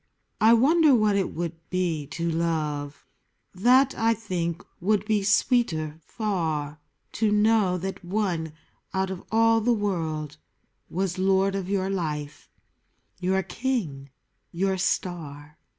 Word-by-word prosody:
I 220 +2 +7
wonder 295 +4 +5
what 215 -3 +3
it 195 -2 0
would 170 0 -3 0.2
be 170 -6 -1
to 170 +3 -3
love: 155 -3 -2 0.5
That, 255 +8 +4
I 225 0 +2
think, 180 -5 -3 0.2
would 210 +2 +1
be 215 -1 +1
sweeter 195 - +1
far, 160 -9 -2 0.2
— - - -48
To 215 -1 +3
know 210 -3 +3
that 190 +2 -5
one 175 -4 -2 0.4
out 190 0 0
of 185 - -6
all 225 0 +4
the 240 +3 +2
world 160 -8 -2 0.5
Was 185 +1 -2
lord 190 +1 +2
of 195 -1 -3
your 195 -1 0
life, 150 -6 -4 0.7
your 190 +1 +1
king, 185 - -3 0.4
your 190 +2 0
star! 155 -6 -3
190 Hz, 130 wpm, -26 LUFS, 160-210 Hz, 0.7 s, I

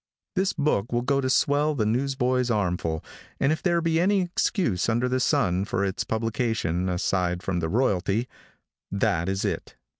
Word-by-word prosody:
This 190 0 +2
book 145 - 0
will 120 0 0
go 140 +2 +1
to 130 - -1
swell 145 +3 +2
the 110 -5 0
newsboy's 125 +1 +1
armful, 90 -7 -1 0.3
and 135 - +3
if 155 - -1
there 170 -2 +2
be 165 0 +1
any 195 +2 +3
excuse, 175 - 0
under 120 +2 +1
the 130 +1 0
sun, 100 - +2
for 100 0 -1
its 95 +1 -2
publication, 110 -6 -1
aside 90 0 0
from 90 -2 -1
the 80 -1 -2
royalty; 105 +1 +1 0.6
that 100 -4 0
is 95 0 -1
it. - - -3
115 Hz, 170 wpm, -25 LUFS, 95-140 Hz, 0.6 s, and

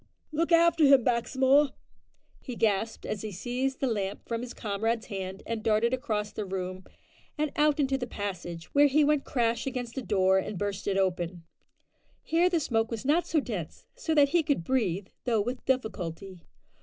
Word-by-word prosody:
"Look 330 +3 0
after 335 -1 +5
him, 275 -3 +6
Baxmore," 265 +4 +3 0.7
he 250 - -6
gasped, 220 0 0
as 205 - -3
he 215 - -5
seized 250 +7 -2
the - - +2
lamp 205 -4 -3
from 230 0 -2
his 245 -1 -6
comrade's 225 +1 -2
hand, 190 -2 -6
and 230 -1 -3
darted 225 +2 +2
across 215 -6 -2
the 215 - -4
room 185 -1 -5 0.5
and 300 -1 0
out 300 0 +3
into 270 -1 +1
the 245 - -3
passage, 175 -6 -6
where 290 0 +6
he 295 +2 +3
went 295 -1 +2
crash 235 -1 0
against 250 -2 -4
a - - -4
door 190 -4 +3
and 190 +1 -4
burst 200 0 -3
it 195 -1 +1
open. 180 -2 -1 0.8
Here 340 +2 +3
the 345 -2 +1
smoke 225 -6 0
was 230 +1 -5
not 315 +5 +2
so 320 - +2
dense, 205 - -6
so 345 -11 -2
that 285 -2 +5
he 345 +3 +3
could 285 - 0
breathe, 200 -6 0 0.2
though 235 -3 +2
with 245 +5 -3
difficulty. 195 -7 -3
230 Hz, 180 wpm, -28 LUFS, 200-275 Hz, 0.8 s, him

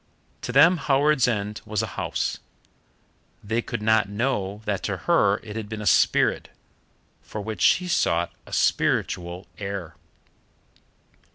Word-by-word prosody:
To - - -4
them 160 +8 +6
Howards 145 -2 +2
End 105 -3 -2
was 110 0 -2
a 110 - -6
house: - - -2 1.0
they 110 +3 -1
could 115 -2 -5
not 110 -2 +3
know 105 -2 -2
that 100 -2 -1
to - - -2
her 100 0 +3
it 105 -1 -8
had 110 -2 -5
been 110 -1 -5
a 105 - -6
spirit, - - +3 0.7
for 110 - -7
which 105 -3 -5
she 180 - +4
sought 85 - +1 0.2
a - - -13
spiritual 90 +1 0
heir. 100 -4 -5
105 Hz, 135 wpm, -24 LUFS, 100-120 Hz, 1.0 s, them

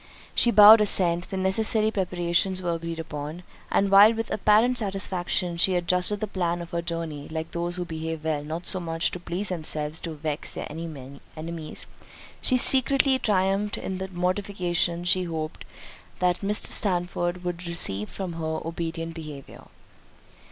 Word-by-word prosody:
She 240 - +3
bowed 215 0 +9
assent; 175 -4 +3
the 195 - -4
necessary 215 +3 +3
preparations 185 -1 0
were 175 -2 -2
agreed 165 0 -5
upon; 155 +1 -6 0.3
and 195 0 +1
while 205 +3 +7
with 225 0 -4
apparent 220 +4 +3
satisfaction 185 -3 -1
she 185 +2 +2
adjusted 180 +3 +1
the - - 0
plan 175 -4 -2
of 170 0 -8
her 170 - -2
journey, 165 -4 -5
(like 160 0 -5
those 175 +1 -3
who 180 -1 -3
behave 160 -1 -5
well, 150 -2 -1
not 160 +4 -6
so 185 - 0
much 165 -1 -1
to 180 - -6
please 180 +3 -3
themselves 155 -3 -1
as - - -14
to 165 -2 -6
vex 150 0 -4
their - - -6
enemies,) 155 +1 -8 0.6
she 255 - +4
secretly 265 +1 +4
triumphed 195 0 0
in 190 -1 -5
the 190 - -4
mortification 180 -2 -1
she 180 +1 +1
hoped 160 -1 -5 0.5
that 180 -1 +1
Mr. 205 +1 0
Sandford 175 -2 +1
would 175 0 -5
receive 105 - -2
from 185 -3 -6
her 160 -1 -3
obedient 165 0 -4
behaviour. 150 -4 -10
175 Hz, 160 wpm, -25 LUFS, 165-195 Hz, 0.6 s, bowed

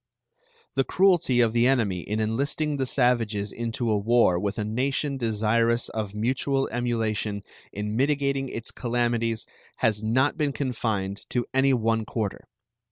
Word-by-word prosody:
The - - +2
cruelty 175 -10 +3
of 115 -2 +2
the 120 +1 +4
enemy 110 -9 +1
in 105 +5 -3
enlisting 140 +7 0
the 130 -1 -1
savages 115 -6 +1
into 115 0 -2
a 105 - +2
war 110 -4 +3
with 100 +1 -2
a 105 - -1
nation 135 +5 -1
desirous 115 0 +1
of 105 -2 -4
mutual 130 +4 0
emulation 110 -4 -1 0.3
in 105 +1 -4
mitigating 140 0 +1
its 115 -1 -6
calamities 120 -2 -1 0.3
has 105 -2 +1
not 130 +8 +1
been 150 -4 0
confined 110 -8 -2
to 120 -2 -1
any 135 +1 +4
one 115 -1 0
quarter. 110 -3 -4
115 Hz, 145 wpm, -26 LUFS, 110-130 Hz, 0.3 s, the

